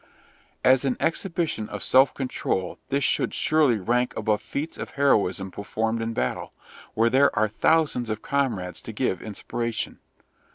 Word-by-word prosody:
As 130 Hz, +1 st, +5 dB
an 130 Hz, -3 st, 0 dB
exhibition 165 Hz, -, -1 dB
of 105 Hz, -2 st, -5 dB
self 130 Hz, +2 st, +5 dB
control 110 Hz, -8 st, -2 dB
this 140 Hz, +1 st, +1 dB
should -, -, +1 dB
surely 150 Hz, -7 st, +3 dB
rank 120 Hz, +5 st, 0 dB
above 105 Hz, -1 st, 0 dB
feats 150 Hz, +3 st, -5 dB
of -, -, -5 dB
heroism 100 Hz, -9 st, +2 dB
performed 110 Hz, +3 st, -2 dB
in 115 Hz, 0 st, -2 dB
battle, -, -, -2 dB, 0.4 s
where 115 Hz, +1 st, +3 dB
there 135 Hz, -2 st, +4 dB
are 110 Hz, 0 st, +3 dB
thousands 125 Hz, +1 st, +1 dB
of 110 Hz, 0 st, -3 dB
comrades 115 Hz, -, -1 dB
to 110 Hz, -, -8 dB
give 105 Hz, -5 st, -1 dB
inspiration. 115 Hz, +2 st, -4 dB
115 Hz, 150 wpm, -25 LUFS, 105-140 Hz, 0.4 s, As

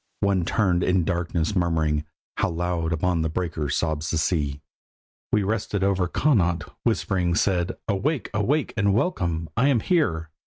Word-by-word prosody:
One 95 Hz, -3 st, +2 dB
turnèd 90 Hz, -4 st, +1 dB
in 90 Hz, -, +2 dB
the -, -, -1 dB
darkness 85 Hz, +1 st, -1 dB
murmuring, 80 Hz, -4 st, +1 dB, 0.3 s
"How -, -, +1 dB
loud 85 Hz, -1 st, -1 dB
upon 85 Hz, +1 st, +1 dB
the 80 Hz, -, 0 dB
breakers 80 Hz, -4 st, -2 dB
sobs 80 Hz, -1 st, -1 dB
the 80 Hz, -, 0 dB
sea!" 75 Hz, -3 st, 0 dB, 0.7 s
We 105 Hz, -, +3 dB
rested 100 Hz, -1 st, -1 dB
over 95 Hz, -2 st, +2 dB
Connaught—whispering 90 Hz, -, 0 dB
said: 90 Hz, -3 st, +1 dB
"Awake, 125 Hz, +8 st, -1 dB
awake, 125 Hz, +8 st, 0 dB
and 100 Hz, -3 st, +2 dB
welcome! 85 Hz, -, 0 dB
I 125 Hz, +4 st, +3 dB
am 135 Hz, -5 st, +3 dB
here." 80 Hz, -, 0 dB
90 Hz, 150 wpm, -24 LUFS, 80-100 Hz, 0.7 s, We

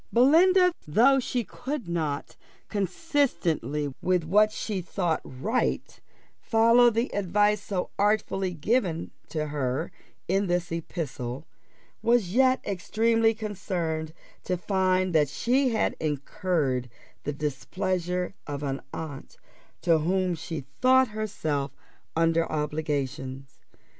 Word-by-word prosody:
Belinda, 360 Hz, +9 st, +5 dB
though 250 Hz, -, +5 dB
she 245 Hz, -1 st, -1 dB
could 260 Hz, 0 st, -5 dB
not, 155 Hz, -4 st, -2 dB, 0.3 s
consistently 180 Hz, -, 0 dB
with 180 Hz, -2 st, +2 dB
what 210 Hz, +6 st, +4 dB
she 205 Hz, -3 st, -3 dB
thought 175 Hz, -2 st, -1 dB
right, 205 Hz, -, -2 dB, 0.4 s
follow 230 Hz, +1 st, +5 dB
the 230 Hz, +2 st, -1 dB
advice 205 Hz, +2 st, +2 dB
so 190 Hz, -3 st, -3 dB
artfully 200 Hz, -2 st, +1 dB
given 175 Hz, -, 0 dB, 0.2 s
to 155 Hz, -2 st, -2 dB
her 135 Hz, -3 st, -2 dB, 0.4 s
in 195 Hz, +2 st, +1 dB
this 175 Hz, -1 st, -1 dB
epistle, 150 Hz, -5 st, -4 dB, 0.6 s
was 230 Hz, -6 st, +2 dB
yet 260 Hz, +1 st, +4 dB
extremely 225 Hz, +3 st, +2 dB
concerned 180 Hz, -7 st, -3 dB, 0.3 s
to 180 Hz, -, -1 dB
find 185 Hz, 0 st, +1 dB
that 150 Hz, -3 st, +4 dB
she 255 Hz, -, +2 dB
had 225 Hz, -2 st, 0 dB
incurred 150 Hz, -4 st, -1 dB, 0.3 s
the 145 Hz, -, -2 dB
displeasure 180 Hz, +5 st, -2 dB
of 145 Hz, 0 st, -4 dB
an 135 Hz, -1 st, -2 dB
aunt 150 Hz, -4 st, -7 dB, 0.5 s
to 165 Hz, -3 st, +4 dB
whom 185 Hz, +3 st, +1 dB
she 160 Hz, -1 st, -5 dB, 0.2 s
thought 260 Hz, -1 st, +5 dB
herself 160 Hz, -, -2 dB, 0.4 s
under 165 Hz, 0 st, +2 dB
obligations. 140 Hz, -3 st, -3 dB
180 Hz, 110 wpm, -27 LUFS, 155-220 Hz, 0.6 s, Belinda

